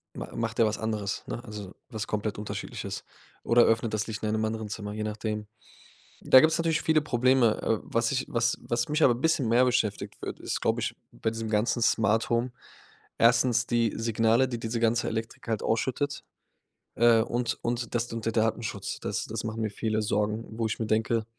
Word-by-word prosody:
m -, -, -5 dB
macht 115 Hz, 0 st, -2 dB
der 115 Hz, -, +5 dB
was 110 Hz, 0 st, 0 dB
anderes, 105 Hz, -3 st, -2 dB
ne, -, -, -4 dB
also 105 Hz, -4 st, -8 dB, 0.2 s
was 110 Hz, -1 st, -4 dB
komplett 105 Hz, -1 st, -2 dB
Unterschiedliches 105 Hz, -, -5 dB, 0.4 s
oder 120 Hz, 0 st, +5 dB
öffnet 115 Hz, 0 st, +1 dB
das 110 Hz, 0 st, -1 dB
Licht 110 Hz, -1 st, -5 dB
in 110 Hz, -, 0 dB
einem 110 Hz, 0 st, 0 dB
anderen 110 Hz, 0 st, -3 dB
Zimmer, 105 Hz, 0 st, -5 dB
je 105 Hz, 0 st, -3 dB
nachdem. 105 Hz, 0 st, -3 dB, 0.8 s
Da 130 Hz, -, +7 dB
gibt's 155 Hz, +4 st, +3 dB
natürlich 165 Hz, -1 st, +1 dB
viele 160 Hz, -1 st, +3 dB
Probleme. 125 Hz, -4 st, +3 dB
Äh, 110 Hz, -, +1 dB
was 115 Hz, +2 st, 0 dB
ich 130 Hz, -, -1 dB
was 120 Hz, 0 st, +1 dB
was 120 Hz, 0 st, -1 dB
mich 150 Hz, +2 st, +1 dB
aber 125 Hz, -, +6 dB
'n 120 Hz, -, -7 dB
bisschen 160 Hz, -7 st, +2 dB
mehr 120 Hz, +2 st, +5 dB
beschäftigt 115 Hz, -5 st, -1 dB
wird -, -, -5 dB
ist, -, -, -3 dB
glaube -, -, +1 dB
ich, -, -, -2 dB, 0.2 s
bei 110 Hz, -, -2 dB
diesem 115 Hz, 0 st, -4 dB
ganzen 110 Hz, +3 st, +1 dB
Smart-Home 115 Hz, +2 st, +2 dB, 0.7 s
1. 120 Hz, +1 st, +4 dB
die 115 Hz, -2 st, +1 dB
Signale, 115 Hz, +2 st, +2 dB
die 120 Hz, -, -4 dB
diese 115 Hz, +1 st, -2 dB
ganze 115 Hz, 0 st, +2 dB
Elektrik 115 Hz, +1 st, -5 dB
halt 110 Hz, -2 st, -1 dB
ausschüttet, 135 Hz, +5 st, -1 dB, 0.7 s
äh, 115 Hz, -1 st, +5 dB
und 120 Hz, +1 st, -1 dB
und 120 Hz, 0 st, -2 dB
das 120 Hz, 0 st, 0 dB
d 115 Hz, -, -7 dB
und 115 Hz, -, -5 dB
der 115 Hz, -, 0 dB
Datenschutz. 110 Hz, 0 st, -1 dB
Das -, -, -3 dB
das 110 Hz, 0 st, -4 dB
machen 110 Hz, +1 st, -3 dB
mir 110 Hz, -, -1 dB
viele 110 Hz, +1 st, -1 dB
Sorgen, 105 Hz, +2 st, -1 dB
wo 115 Hz, -, 0 dB
ich 110 Hz, -, -4 dB
mir 110 Hz, -, -1 dB
denke: 110 Hz, +1 st, +1 dB
115 Hz, 200 wpm, -28 LUFS, 110-120 Hz, 0.8 s, Da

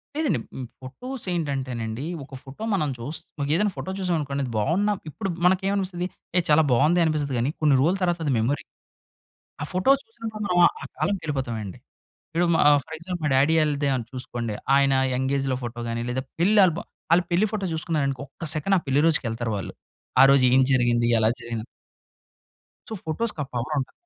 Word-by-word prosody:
లేదండి. 300 Hz, -, +1 dB, 0.2 s
మ్ 130 Hz, -, -4 dB, 0.2 s
ఫోటోస్ 240 Hz, -, -6 dB
ఏంటంటేనండి 130 Hz, -6 st, -3 dB, 0.2 s
ఒక 135 Hz, 0 st, -11 dB
ఫోటో 140 Hz, +9 st, -9 dB
మనం 155 Hz, -7 st, +1 dB
చూస్ 140 Hz, +7 st, -5 dB, 0.4 s
ఏదైనా 205 Hz, +3 st, +2 dB
ఫోటో 190 Hz, -, -4 dB
చూసాం 180 Hz, -2 st, 0 dB
అనుకోండి 140 Hz, -1 st, -3 dB
అది 125 Hz, -, -6 dB
బావున్న 175 Hz, -, +1 dB, 0.2 s
ఇప్పుడు 195 Hz, +6 st, -4 dB, 0.2 s
మనకేమనిపిస్తుంది 190 Hz, -1 st, +1 dB, 0.3 s
ఏ -, -, +7 dB
చాలా 150 Hz, +1 st, +6 dB
బావుందె 150 Hz, +8 st, +4 dB
అనిపిస్తది 150 Hz, -4 st, 0 dB
గానీ 125 Hz, +4 st, +1 dB
కొన్ని 150 Hz, -3 st, +4 dB
రోజుల 170 Hz, +7 st, +3 dB
తర్వాత 175 Hz, -1 st, +1 dB
అది 145 Hz, -, +1 dB
మెమొరీ. 135 Hz, +6 st, 0 dB, 1.0 s
ఆ -, -, -1 dB
ఫోటో 185 Hz, +8 st, +2 dB
చూసినప్పుడు 225 Hz, -1 st, -8 dB
మనం 180 Hz, -2 st, +1 dB, 0.2 s
ఆ -, -, -5 dB
కాలంకెళ్ళిపోతామండి. 130 Hz, -, -2 dB, 0.5 s
ఇప్పుడు 170 Hz, +2 st, +1 dB
మా -, -, +3 dB, 0.2 s
ఫర్ 160 Hz, -, -7 dB
ఎగ్జాంపుల్ 175 Hz, 0 st, -6 dB
మా -, -, +2 dB
డ్యాడీ 145 Hz, +5 st, +4 dB
ఆళ్ళదే 145 Hz, -1 st, 0 dB
అన్ 120 Hz, -3 st, -3 dB
చూసుకోండి. 120 Hz, -4 st, -4 dB, 0.2 s
ఆయన 140 Hz, -1 st, +4 dB, 0.2 s
యంగ్ఏజ్‌లో 135 Hz, 0 st, 0 dB
ఫోటో 120 Hz, 0 st, -5 dB
గాని 115 Hz, 0 st, -2 dB
లేదా 130 Hz, +2 st, -2 dB, 0.2 s
పెళ్ళి 205 Hz, +5 st, +4 dB
ఆల్భమ్ 170 Hz, -2 st, -2 dB, 0.3 s
ఆళ్ళ 175 Hz, -, +5 dB
పెళ్లి 180 Hz, +5 st, +3 dB
ఫోటో 210 Hz, -3 st, -2 dB
చూసుకున్నారనుకో 150 Hz, -5 st, -1 dB
ఒక్క 165 Hz, -, -8 dB
సెకండ్ 175 Hz, +6 st, +1 dB
ఆ -, -, +1 dB
పెళ్ళి 135 Hz, +2 st, +3 dB
రోజుకి 155 Hz, -4 st, +2 dB
ఎళ్తారు 115 Hz, 0 st, -3 dB
వాళ్ళు. 95 Hz, -, -6 dB, 0.5 s
ఆ -, -, +10 dB
రోజు 140 Hz, -2 st, +5 dB
ఏం 130 Hz, -, +6 dB
జరిగింది? 120 Hz, -2 st, +2 dB
ఎలా 110 Hz, 0 st, +3 dB
జరిగిన 115 Hz, -2 st, -4 dB, 1.3 s
సో -, -, -6 dB
ఫోటోస్‌కా 160 Hz, 0 st, -1 dB
పవర్ 125 Hz, +5 st, -2 dB
ఉంటది. 130 Hz, -, -4 dB
145 Hz, 170 wpm, -25 LUFS, 130-180 Hz, 1.3 s, ఆ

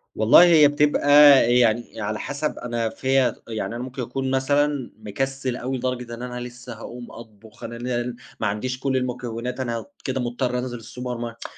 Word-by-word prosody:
والله، 110 Hz, +10 st, +7 dB
هي 160 Hz, -4 st, +7 dB
بتبقى 145 Hz, 0 st, +1 dB, 0.5 s
يعني 115 Hz, -1 st, +1 dB
على 105 Hz, +1 st, -3 dB
حسَب 145 Hz, +2 st, -3 dB
أنا 120 Hz, -2 st, -2 dB
فيَّا 130 Hz, 0 st, +1 dB
يعني، 115 Hz, 0 st, -4 dB
أنا 120 Hz, -, -4 dB
ممكن 130 Hz, 0 st, -6 dB
أكون 130 Hz, +2 st, -3 dB
مثلًا 140 Hz, 0 st, +1 dB
مكسَل 130 Hz, +4 st, -3 dB
أوي، 130 Hz, +2 st, -3 dB
لدرجة 125 Hz, -1 st, -3 dB
إن 115 Hz, -, -8 dB
أنا 125 Hz, 0 st, -5 dB
لسّه 125 Hz, 0 st, -8 dB
هاقوم 120 Hz, +2 st, -9 dB
أطبُخ، 110 Hz, -1 st, -14 dB
أنا 115 Hz, -, -6 dB
لل 120 Hz, 0 st, -3 dB, 0.2 s
ما 115 Hz, -, 0 dB
عنديش 125 Hz, +5 st, -3 dB
كل 130 Hz, 0 st, 0 dB
المكونات، 125 Hz, 0 st, -4 dB
أنا 115 Hz, -3 st, -3 dB, 0.2 s
كده 130 Hz, -1 st, -2 dB
مضطر 125 Hz, +1 st, -2 dB
أنزِل 120 Hz, -2 st, -5 dB
الsupermarket. 120 Hz, 0 st, -6 dB
125 Hz, 165 wpm, -23 LUFS, 115-130 Hz, 0.5 s, والله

